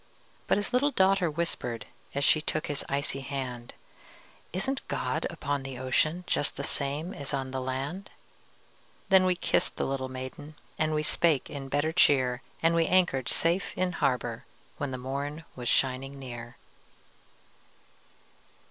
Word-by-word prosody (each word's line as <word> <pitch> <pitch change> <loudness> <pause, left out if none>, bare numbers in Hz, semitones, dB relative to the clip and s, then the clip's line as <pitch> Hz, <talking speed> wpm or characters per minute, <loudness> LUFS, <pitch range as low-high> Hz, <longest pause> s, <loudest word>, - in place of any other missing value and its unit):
But - - +4
his 205 +4 -2
little 270 +4 +4
daughter 190 - +3
whispered, 125 -9 -2 0.3
As 140 - +1
she 155 - +5
took 155 +1 -1
his 145 -3 -2
icy 140 0 0
hand, 130 -3 -5 0.8
"Isn't 260 +10 -1
God - - -1
upon 145 -1 -2
the 135 -1 -6
ocean, 155 +7 +1
Just 145 - 0
the - - -3
same 145 +5 0
as 140 -1 -3
on 130 -1 -3
the 130 0 -2
land?" 135 +9 -3 1.0
Then 190 -1 +7
we 180 - +3
kissed - - +1
the - - -1
little 135 -1 -2
maiden, 130 +4 -7 0.2
And 155 0 +2
we 150 - +1
spake 150 -2 +3
in 135 -2 -6
better 145 +3 +1
cheer, 130 -6 +4 0.2
And 165 +1 +5
we 165 -1 +3
anchored 175 -9 +3
safe 170 +4 +1
in 185 -1 +1
harbor 125 -7 0 0.3
When 145 - -2
the 130 - -4
morn 140 +5 -4
was 120 -2 -3
shining 135 +1 +1
clear. 120 -3 -8
140 Hz, 150 wpm, -29 LUFS, 130-170 Hz, 1.0 s, Then